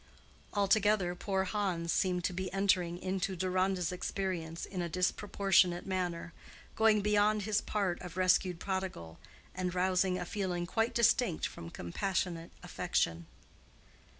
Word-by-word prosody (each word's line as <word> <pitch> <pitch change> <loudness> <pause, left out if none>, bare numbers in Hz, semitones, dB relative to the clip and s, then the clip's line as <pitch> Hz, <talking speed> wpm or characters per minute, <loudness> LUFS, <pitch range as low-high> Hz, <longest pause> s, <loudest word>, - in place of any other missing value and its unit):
Altogether 200 -2 +3
poor 190 +1 -1
Hans 185 -4 -1
seemed 180 -2 +1
to 180 - 0
be 185 +1 -3
entering 185 -3 +1
into 190 0 -1
Deronda's 185 0 0
experience 180 -3 -3
in 185 -2 -4
a 170 - -2
disproportionate 180 0 +2
manner—going 185 +4 -1
beyond 210 0 +2
his 215 +1 +1
part 195 -5 -1
of 180 0 -8
rescued 185 -1 +3
prodigal, 185 - -4 0.3
and 185 -1 -3
rousing 185 0 +2
a 180 - -4
feeling 180 -2 -2
quite 225 +6 0
distinct 235 -6 +3
from 85 - -7
compassionate 170 - -2
affection. 85 0 -1
185 Hz, 125 wpm, -32 LUFS, 175-195 Hz, 0.3 s, Altogether